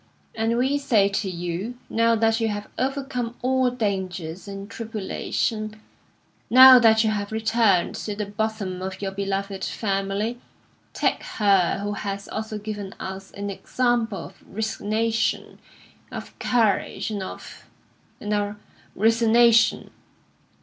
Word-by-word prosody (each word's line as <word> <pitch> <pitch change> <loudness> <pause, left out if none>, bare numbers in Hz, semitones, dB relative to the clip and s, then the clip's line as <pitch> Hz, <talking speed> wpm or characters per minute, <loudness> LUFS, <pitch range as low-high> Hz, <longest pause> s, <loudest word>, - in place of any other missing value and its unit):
And 225 +1 0
we 265 +4 +1
say 215 -8 +3
to 195 0 -2
you, 180 +7 -4
now 230 0 +2
that 225 0 +2
you 225 - +1
have 205 -1 -4
overcome 260 -3 -2
all 260 0 +2
dangers 190 -7 -3
and 195 0 -7
tribulation, 215 0 -3 0.7
now 255 +1 +10
that 220 -1 +5
you 220 - +2
have 205 -1 -3
returned 220 -4 +2
to 210 - -4
the 210 0 -3
bosom 205 -3 -3
of 190 0 -5
your 195 -1 -3
beloved 195 0 -3
family, 200 +3 -2 0.5
take - - 0 0.2
her 195 -5 +3
who 205 0 -2
has 200 -1 -5
also 220 0 -4
given 205 -2 -6
us 190 +1 -6
an 200 0 -4
example 235 0 0
of - - -15
resignation, 220 +2 -1 0.5
of - - -7
courage, 225 -2 +1
and 205 -2 -3
of 190 - -9 0.5
and 210 0 -3
of 205 0 -1 0.4
resignation. 230 +1 +4
215 Hz, 130 wpm, -24 LUFS, 195-230 Hz, 0.7 s, now